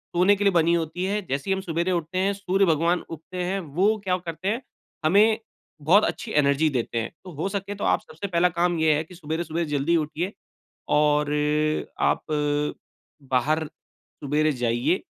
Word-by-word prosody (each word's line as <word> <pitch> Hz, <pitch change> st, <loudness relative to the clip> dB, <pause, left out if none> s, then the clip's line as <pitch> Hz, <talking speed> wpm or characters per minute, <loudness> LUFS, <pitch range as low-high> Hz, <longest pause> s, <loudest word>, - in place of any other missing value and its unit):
सोने 185 Hz, +4 st, +5 dB
के 205 Hz, -, -2 dB
लिए 200 Hz, -, +4 dB
बनी 170 Hz, 0 st, +3 dB
होती 170 Hz, +2 st, -1 dB
है। 205 Hz, +2 st, 0 dB
जैसे 140 Hz, +7 st, -3 dB
ही -, -, +4 dB
हम 190 Hz, -, -2 dB
सवेरे 170 Hz, +1 st, -1 dB
उठते 170 Hz, +1 st, -2 dB
हैं, 195 Hz, +2 st, +2 dB
सूर्य 195 Hz, 0 st, +1 dB
भगवान 170 Hz, +1 st, +2 dB
उगते 170 Hz, +3 st, -6 dB
हैं, 190 Hz, +2 st, -1 dB
वो 185 Hz, +6 st, +1 dB
क्या 185 Hz, -1 st, +1 dB
करते 170 Hz, +1 st, -6 dB
हैं, 230 Hz, +5 st, 0 dB, 0.4 s
हमें 210 Hz, +6 st, +5 dB, 0.4 s
बहुत 185 Hz, +9 st, +5 dB
अच्छी 220 Hz, -, -4 dB
एनर्जी 145 Hz, +2 st, +3 dB
देते 120 Hz, -4 st, -2 dB
हैं। 115 Hz, -, -5 dB
तो 180 Hz, -, -9 dB
हो 160 Hz, +6 st, -2 dB
सके 200 Hz, 0 st, -4 dB
तो 200 Hz, -, -6 dB
आप -, -, +2 dB
सबसे 165 Hz, +6 st, -7 dB
पहला 180 Hz, -1 st, +3 dB
काम 175 Hz, 0 st, +2 dB
ये 160 Hz, -1 st, +4 dB
है 155 Hz, -, -1 dB
कि 180 Hz, +3 st, -14 dB
सवेरे-सवेरे 165 Hz, 0 st, -3 dB
जल्दी 145 Hz, +3 st, +1 dB
उठिए 160 Hz, +5 st, -2 dB, 0.6 s
और 150 Hz, -1 st, +2 dB
अ 150 Hz, +1 st, 0 dB
आप -, -, +3 dB
अ, 150 Hz, 0 st, 0 dB, 0.6 s
बाहर 150 Hz, +6 st, +2 dB, 0.4 s
सवेरे 150 Hz, +2 st, -1 dB
जाइए 120 Hz, +8 st, +2 dB
170 Hz, 185 wpm, -25 LUFS, 150-185 Hz, 0.6 s, सोने